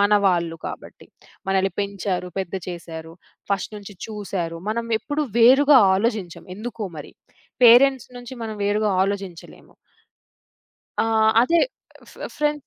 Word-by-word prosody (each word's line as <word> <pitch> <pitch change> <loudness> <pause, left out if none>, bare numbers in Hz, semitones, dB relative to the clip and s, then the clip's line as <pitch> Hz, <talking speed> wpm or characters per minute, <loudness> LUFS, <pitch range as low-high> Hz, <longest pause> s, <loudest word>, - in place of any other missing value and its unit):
మన 205 +1 +3 0.2
వాళ్ళు 170 -3 0
కాబట్టి. - - -9 0.4
మనల్ని 190 -1 +1
పెంచారు, 195 -2 -3
పెద్ద 190 0 -6
చేశారు. 165 -2 -8 0.4
ఫస్ట్ 200 +2 -2
నుంచి 205 0 -11
చూసారు. 190 -6 -4
మనం 230 +1 -2
ఎప్పుడూ 295 +5 -2
వేరుగా 270 +4 +7 0.2
ఆలోచించం, 200 -3 -2
ఎందుకో 225 0 -6
మరి. 145 - -10 0.5
పేరెంట్స్ 255 +2 +6
నుంచి 245 +1 -10
మనం 220 -1 -5
వేరుగా 210 +1 +1
ఆలోచించలేము. 195 -3 -6 1.3
ఆ! - - 0 0.4
అదే 335 +7 +3 0.5
ఫ్రె - - -7
ఫ్రెండ్స్ 295 -2 -1
205 Hz, 120 wpm, -22 LUFS, 185-235 Hz, 1.3 s, వేరుగా